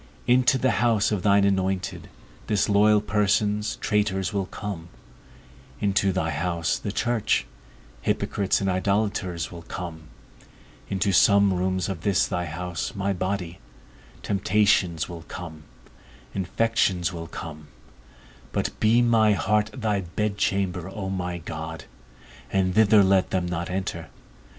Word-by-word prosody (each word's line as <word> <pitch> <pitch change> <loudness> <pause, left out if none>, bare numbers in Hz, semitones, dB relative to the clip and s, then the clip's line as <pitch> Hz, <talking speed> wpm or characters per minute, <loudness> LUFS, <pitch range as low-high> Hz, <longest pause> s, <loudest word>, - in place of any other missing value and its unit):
Into 125 +2 +4
the 130 -1 +2
house 115 -4 +2
of 105 -3 0
thine 100 +1 +4
anointed, 95 -1 -1 0.4
disloyal 105 0 +3
persons, 105 0 +1
traitors, 105 -2 0
will 100 -2 -1
come; 95 -6 -6 0.9
into 100 -1 +2
thy 90 -3 -1
house, 85 +2 -1
the 100 - -4
church, 120 0 0 0.6
hypocrites 100 -1 0
and 95 - 0
idolators 95 -3 -1
will 85 -2 -9
come; 80 -1 -7 0.8
into 100 0 0
some 100 +1 +5
rooms 95 0 0
of 95 -5 -4
this 100 -3 +2
thy 90 0 -2
house, 85 +3 -4
my 100 0 0
body, 95 -1 -3 0.6
temptations 95 -4 +2
will 85 -2 -8
come, 80 -3 -8 0.7
infections 95 -2 0
will 85 -1 -6
come; 75 -2 -8 0.8
but - - -1
be 115 +3 +4
my 110 -3 +4
heart 105 +2 +1
thy 110 -6 -1
bedchamber, 95 -1 -1
O 95 -1 -5
my 90 -2 -3
God, 80 -1 -7 0.7
and 95 -1 +1
thither 105 0 +6
let 95 -1 +3
them 90 -2 0
not 85 -1 -3
enter. 90 -3 -4
95 Hz, 125 wpm, -25 LUFS, 90-105 Hz, 0.9 s, thither